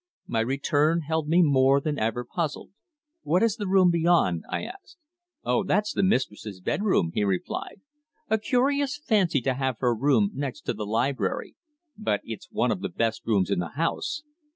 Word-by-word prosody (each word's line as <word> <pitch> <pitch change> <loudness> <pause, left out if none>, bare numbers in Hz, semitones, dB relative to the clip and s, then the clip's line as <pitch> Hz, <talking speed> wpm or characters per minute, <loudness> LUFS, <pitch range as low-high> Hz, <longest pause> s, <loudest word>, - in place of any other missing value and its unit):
My 115 - -1
return 145 +6 +1
held 160 0 -2
me 175 +2 +5
more 135 -2 +4
than 145 +1 -2
ever 115 +3 -1
puzzled. 160 +2 -4 0.5
"What 180 - +2
is 230 -1 +2
the 205 -3 -3
room 185 -2 +5
beyond?" 170 - +2
I - - -2
asked. 370 -1 -10 0.5
"Oh! 125 0 +1
That's 210 +2 0
the - - 0
mistress's 110 - -1
bedroom," 90 - +1
he - - 0
replied. 100 - -3 0.5
"A 220 0 +1
curious 275 +4 +1
fancy 205 - +1
to 130 +2 0
have 130 -2 -2
her 125 0 +1
room 115 -4 +2
next 140 +1 -4
to - - -2
the 105 - -5
library. 120 +6 -1 0.4
But 105 - 0
it's 110 -2 -8
one - - +1
of - - -2
the - - -2
best 115 -1 -2
rooms 100 -4 +2
in 100 - +1
the 85 -2 -4
house. 230 - -1
145 Hz, 175 wpm, -26 LUFS, 115-185 Hz, 0.5 s, me